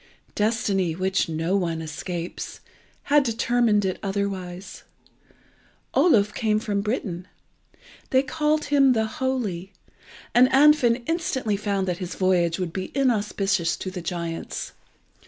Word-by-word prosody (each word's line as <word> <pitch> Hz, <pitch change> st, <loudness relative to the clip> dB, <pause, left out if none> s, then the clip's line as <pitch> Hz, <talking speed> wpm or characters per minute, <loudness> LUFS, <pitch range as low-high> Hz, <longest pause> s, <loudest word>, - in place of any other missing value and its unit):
Destiny, 205 Hz, -5 st, 0 dB
which 190 Hz, 0 st, 0 dB
no 165 Hz, +4 st, -1 dB
one 170 Hz, -4 st, -1 dB
escapes, 165 Hz, +2 st, -6 dB, 0.4 s
had 290 Hz, +1 st, +4 dB
determined 230 Hz, -3 st, +1 dB
it 185 Hz, -, -2 dB
otherwise. 195 Hz, -2 st, -4 dB, 1.1 s
Oluf 210 Hz, -, +4 dB
came 215 Hz, -2 st, +1 dB
from 205 Hz, -2 st, -1 dB
Britain. 200 Hz, -5 st, -3 dB, 0.8 s
They 260 Hz, 0 st, +3 dB
called 300 Hz, +2 st, 0 dB
him 275 Hz, -3 st, +4 dB
the 220 Hz, -2 st, +1 dB
Holy, 220 Hz, -7 st, -3 dB, 0.6 s
and 250 Hz, +1 st, +6 dB
Andfind 265 Hz, -4 st, +5 dB
instantly 260 Hz, -9 st, -1 dB
found 200 Hz, -2 st, -1 dB
that 180 Hz, -1 st, -2 dB
his 180 Hz, -2 st, -5 dB
voyage 175 Hz, -3 st, +2 dB
would 180 Hz, -3 st, -3 dB
be 190 Hz, -1 st, -4 dB
inauspicious 200 Hz, -8 st, +1 dB
to 185 Hz, -, -5 dB
the 185 Hz, -1 st, -6 dB
giants. 170 Hz, -1 st, -4 dB
200 Hz, 120 wpm, -24 LUFS, 180-240 Hz, 1.1 s, and